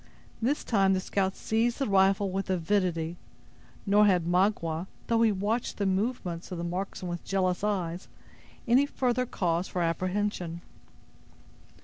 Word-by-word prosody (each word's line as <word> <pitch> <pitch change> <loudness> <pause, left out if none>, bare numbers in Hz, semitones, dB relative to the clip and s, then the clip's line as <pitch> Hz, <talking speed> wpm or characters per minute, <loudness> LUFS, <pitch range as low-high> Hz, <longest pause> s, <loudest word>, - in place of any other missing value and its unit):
This 270 +6 0
time 195 -4 +3
the 190 - +1
scout 190 0 -1
seized 230 +2 0
the 275 - 0
rifle 195 -1 +3
with 195 +1 -3
avidity; 175 -2 0 0.7
nor 210 +1 +5
had 180 -4 +3
Magua, 175 -2 +1 0.2
though 230 -1 +2
he 225 -1 +5
watched 210 +5 -1
the 200 - 0
movements 190 -3 -2
of 180 - -4
the 170 - -4
marksman 180 +1 -4
with 175 -1 -4
jealous 185 -1 0
eyes, 185 -4 -2 0.6
any 260 +5 +4
further 250 -2 0
cause 175 -2 -1
for 180 - -2
apprehension. 180 0 -2
190 Hz, 140 wpm, -28 LUFS, 175-210 Hz, 0.7 s, nor